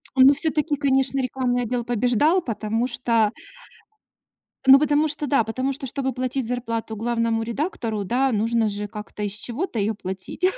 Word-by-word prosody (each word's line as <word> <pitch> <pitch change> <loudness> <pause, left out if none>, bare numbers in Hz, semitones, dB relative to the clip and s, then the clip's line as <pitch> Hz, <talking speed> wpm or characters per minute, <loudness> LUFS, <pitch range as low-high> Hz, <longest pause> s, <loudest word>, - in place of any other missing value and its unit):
Ну 265 +2 +7
всё-таки, 305 0 0
конечно, 270 -1 +1
рекламный 250 -1 -1
отдел 240 +1 -2
побеждал, 245 - +2
потому 225 -2 -2
что 230 -3 +1 1.3
ну 270 +1 +9
потому 300 +1 +2
что 295 0 -2
да. 275 -5 +3
Потому 255 +5 -2
что, 275 0 -5
чтобы 265 +1 -2
платить 255 0 -2
зарплату 230 -2 -3
главному 230 0 0
редактору, 230 - -3
да, 255 +6 +1
нужно 225 +1 +1
же 205 0 -4
как-то 210 0 -7
из 200 - -1
чего-то 235 - -4
ее 210 +2 0
платить. 190 - -7
245 Hz, 155 wpm, -23 LUFS, 225-270 Hz, 1.3 s, ну